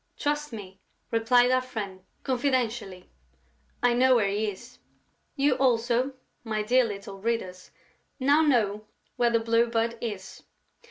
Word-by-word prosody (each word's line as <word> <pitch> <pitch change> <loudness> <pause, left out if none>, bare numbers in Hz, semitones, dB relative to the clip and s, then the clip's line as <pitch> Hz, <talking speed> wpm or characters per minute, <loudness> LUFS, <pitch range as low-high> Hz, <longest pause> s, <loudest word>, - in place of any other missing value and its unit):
"Trust 295 0 -2
me," 195 -4 -9 0.3
replied 245 +2 +4
our 255 0 +3
friend, 205 -7 -6 0.2
confidentially. 240 -7 -1 0.8
"I 245 -1 +4
now 240 - 0
know 260 - +6
where 210 -4 +2
he 210 +2 0
is." 190 - -11 0.6
You 280 -1 +3
also, 245 0 +1 0.3
my 215 -2 -2
dear 250 +4 +4
little 200 -2 -7
readers, 195 -4 -3 0.5
now 285 +4 +4
know 215 -8 +1 0.3
where 240 -1 +3
the 230 -1 +2
Blue 230 +1 +2
Bird 230 0 -1
is. 205 -5 -6
230 Hz, 140 wpm, -27 LUFS, 210-255 Hz, 0.8 s, know